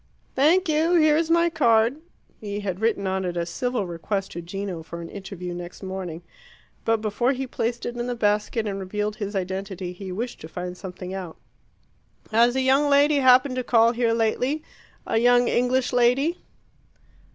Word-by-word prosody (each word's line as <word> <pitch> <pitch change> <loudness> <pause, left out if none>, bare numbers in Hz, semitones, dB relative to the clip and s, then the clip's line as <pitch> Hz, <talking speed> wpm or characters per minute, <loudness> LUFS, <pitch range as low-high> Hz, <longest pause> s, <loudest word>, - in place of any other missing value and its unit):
"Thank 335 +8 +3
you 320 +3 +2
here 310 -3 +5
is 325 +1 +1
my 335 0 +3
card." 230 -1 +3 0.4
He 205 -1 -5
had 190 -2 -3
written 220 -3 0
on 190 0 -1
it 175 -1 -3
a 170 - 0
civil 245 +2 -2
request 190 +3 -3
to 170 - -6
Gino 185 0 -5
for 170 +1 -8
an 170 - -7
interview 190 -3 -7
next 175 +2 -8
morning. 185 -3 -5 0.6
But 225 -1 +1
before 240 +5 +1
he 265 0 -3
placed 235 -1 -3
it 240 - -4
in 240 0 -3
the 245 - -2
basket 210 +1 0
and 200 -2 -3
revealed 210 +2 -3
his 205 -1 -4
identity, 190 -1 -4
he 190 +1 -8
wished 235 +6 -5
to 160 - -8
find 180 +2 -6
something 180 0 -8
out. 185 -4 -6 0.9
"Has 235 +3 +4
a 265 - +2
young 270 +3 +3
lady 285 +1 +4
happened 255 0 +5
to 255 - -1
call 230 -1 +4
here 235 -1 +1
lately 245 +7 0 0.4
a 225 - +1
young 245 +1 +4
English 250 +1 +1
lady?" 250 +8 +2
225 Hz, 180 wpm, -24 LUFS, 190-255 Hz, 0.9 s, here